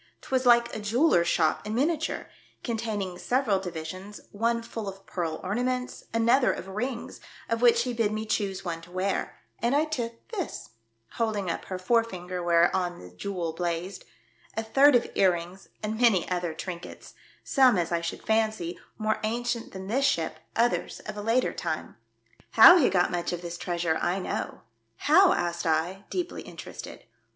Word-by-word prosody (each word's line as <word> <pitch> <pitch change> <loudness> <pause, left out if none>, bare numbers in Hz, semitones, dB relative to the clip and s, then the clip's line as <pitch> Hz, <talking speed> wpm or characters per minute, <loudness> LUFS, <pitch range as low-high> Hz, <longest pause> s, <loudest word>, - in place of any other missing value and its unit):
'Twas 260 -1 0
like 235 0 +5
a - - -3
jeweller's 210 - +3
shop 160 -2 +2
in 215 +1 -4
miniature, 310 +5 0 0.4
containing 215 -6 -3
several 245 -5 +1
divi 175 -4 -5
sions, 185 +5 -8
one 230 +2 0
full 225 -3 -5
of 195 0 -11
pearl 165 -3 -3
ornaments, 250 +6 -2
another 235 +3 +4
of - - -5
rinos, 230 +6 -4 0.3
of 230 0 -1
which 235 -1 +5
he 250 0 -3
bid 225 -3 +1
me 215 +1 -3
choose 195 -3 -2
one 165 -1 -3
to 170 - -14
wear, 185 +2 -2 0.2
and 240 +4 +1
I 300 +2 +3
took 235 -7 -5
this," 385 - -5 0.5
holding 210 -6 0
up - - -5
her 185 - -4
forefinger 185 -3 0
whereon 175 +1 +2
the 90 - -12
jewel 170 - -4
blazed, 175 +2 -3 0.5
"a 225 - 0
third 275 +5 +5
of 240 - +3
ear 190 -2 +4
rings 175 +3 -8
and 215 +2 -3
many 215 -8 +4
other 175 -3 -1
trinkets; 175 0 -8 0.3
some, 260 -6 +4
as 175 -1 -1
I 170 0 +1
should 170 - -5
fancy, 220 -6 0 0.2
more 215 0 0
ancient 235 +1 -2
than 190 0 -7
this 255 +8 +1
ship, 160 - 0 0.2
others 235 +1 +1
of 215 - -7
a 205 - -5
later 230 +4 +1
time. - - -4 0.6
How 360 - +10
he 270 - +4
got 180 -2 +2
much 175 -1 -2
of 175 0 -5
this 170 0 -5
treasure 170 -2 -1
I 175 +2 +1
know." 190 - -4 0.2
" 115 0 -46
How?" 365 +5 +7
asked 175 0 -2
I, 170 +5 0
deeply 360 -1 -3
Interested. - - -9
205 Hz, 175 wpm, -27 LUFS, 175-235 Hz, 0.6 s, How